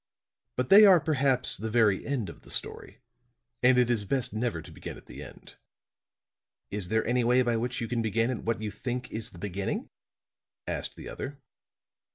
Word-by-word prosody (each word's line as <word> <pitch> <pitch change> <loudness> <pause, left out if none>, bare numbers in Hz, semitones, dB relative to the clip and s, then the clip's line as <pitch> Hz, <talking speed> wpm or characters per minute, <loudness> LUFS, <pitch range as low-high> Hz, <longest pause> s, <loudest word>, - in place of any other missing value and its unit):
But 125 0 -1
they 205 +2 +10
are 185 -3 +8
perhaps 135 -4 +1
the 110 - -4
very 110 -4 +3
end 135 -8 -1
of 85 - -10
the - - -17
story; - - -3 0.6
and 125 0 +5
it 125 -1 +4
is 110 -4 +1
best 125 +1 -1
never 110 -5 -1
to 80 - -11
begin - - -8
at - - -15
the - - -10
end." - - -12 1.1
"Is 100 -3 -2
there 110 0 +1
any 125 +1 +1
way 125 +2 +4
by 120 -1 +1
which 120 +2 -2
you 115 - -2
can 120 -1 -1
begin 115 +2 +1
at 125 - -5
what 115 -1 -1
you 105 - -3
think 125 +5 -5
is 110 0 -3
the - - -15
beginning?" 100 +1 -4 0.8
asked - - -3
the - - -9
other. 140 +1 -6
120 Hz, 195 wpm, -28 LUFS, 110-125 Hz, 1.1 s, they